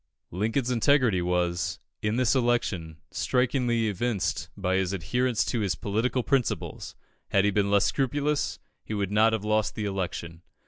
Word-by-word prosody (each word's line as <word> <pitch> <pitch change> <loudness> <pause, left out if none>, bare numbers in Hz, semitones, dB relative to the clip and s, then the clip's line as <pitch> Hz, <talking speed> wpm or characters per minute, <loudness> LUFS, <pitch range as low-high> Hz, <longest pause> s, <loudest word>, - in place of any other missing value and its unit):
Lincoln's 115 - 0
integrity 125 -5 +3
was, 90 0 0 0.2
in 105 +1 0
this 125 -1 +3
election, 120 - 0
strikingly 125 -2 +1
evinced 100 -1 -1
by 95 -1 0
his 95 0 0
adherence 125 +6 0
to 120 - -1
his 100 -5 0
political 115 +7 -1
principles; 135 -2 -1 0.3
had 100 0 +3
he 105 - +3
been 100 0 +1
less 100 -1 +4
scrupulous, 145 +2 0 0.3
he 110 - -4
would 100 -1 -1
not 110 +2 +4
have 110 -2 -2
lost 110 0 +1
the 110 - -3
election. 90 -4 -4
110 Hz, 150 wpm, -27 LUFS, 95-125 Hz, 0.3 s, less